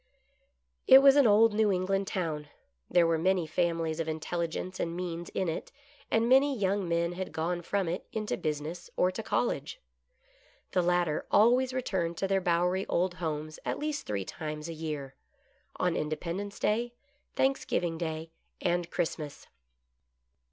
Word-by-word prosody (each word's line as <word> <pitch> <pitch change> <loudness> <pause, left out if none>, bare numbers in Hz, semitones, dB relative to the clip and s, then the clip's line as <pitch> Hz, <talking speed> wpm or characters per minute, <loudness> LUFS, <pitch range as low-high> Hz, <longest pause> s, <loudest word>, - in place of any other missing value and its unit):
It 265 +1 +9
was 275 0 +8
an 285 -4 +6
old 215 +1 +5
New 215 -1 +3
England 195 +1 0
town. 160 -6 -3 0.4
There 175 -1 +4
were 165 -1 +2
many 185 0 +2
families 165 0 -1
of 165 - -1
intelligence 170 +3 -3
and 170 0 -2
means 175 -1 -4
in 190 - -2
it, 160 - -4 0.4
and 225 +1 +2
many 270 +2 +4
young 195 -2 0
men 170 0 +1
had 185 +1 -5
gone 175 +2 -2
from 195 +1 -1
it 175 +3 -3
into 215 -1 -2
business 155 +3 -4
or 180 - +3
to 205 - -5
college. 240 - -1 0.9
The 185 - +2
latter 175 -3 +1
always 245 +5 +4
returned 190 -10 -2
to 195 - 0
their 195 0 +1
bowery 180 +2 +1
old 180 +1 +1
homes 155 -1 -3
at - - -2
least 300 0 -3
three 100 -2 -2
times 150 - -5
a 165 - -5
year; 150 -4 -5 0.6
on 180 -2 0
Independence 170 +6 -3
Day, 235 +3 0 0.4
Thanks 270 0 +2
giving 165 -2 -1
Day, 160 -1 -4 0.3
and 175 -1 0
Christmas. 160 -4 -3
175 Hz, 155 wpm, -30 LUFS, 165-200 Hz, 0.9 s, It